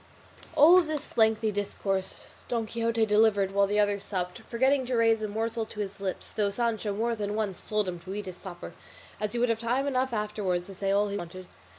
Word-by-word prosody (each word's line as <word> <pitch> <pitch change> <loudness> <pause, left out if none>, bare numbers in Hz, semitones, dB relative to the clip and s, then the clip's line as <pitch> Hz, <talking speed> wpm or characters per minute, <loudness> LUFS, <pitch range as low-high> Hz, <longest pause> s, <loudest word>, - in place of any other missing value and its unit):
All 330 +5 +8
this 310 -3 -3
lengthy 220 -1 +3
discourse 195 -1 -2 0.2
Don 235 -2 -1
Quixote 230 0 0
delivered 210 -2 +3
while 200 0 +3
the 205 +1 +1
others 205 -1 +1
supped, 180 -3 -3
forgetting 260 +3 +1
to 255 - 0
raise 225 -1 +3
a 215 - -1
morsel 225 +2 -2
to 210 - -10
his 200 -1 -4
lips, 190 -2 -4
though 205 -2 0
Sancho 220 0 -1
more 230 +4 0
than 205 -1 -3
once 205 -4 -3
told 210 -2 +1
him 175 -1 -4
to 190 +3 -7
eat 210 0 -4
his 185 -2 -6
supper, 180 -2 -9 0.5
as 210 -1 -2
he - - -2
would 245 0 +2
have 225 -1 +1
time 245 +4 0
enough 260 -2 0
afterwards 210 -5 -1
to 195 - -9
say 195 +1 -2
all 205 +1 +2
he 200 - -2
wanted. 185 0 -7
210 Hz, 215 wpm, -28 LUFS, 200-230 Hz, 0.5 s, All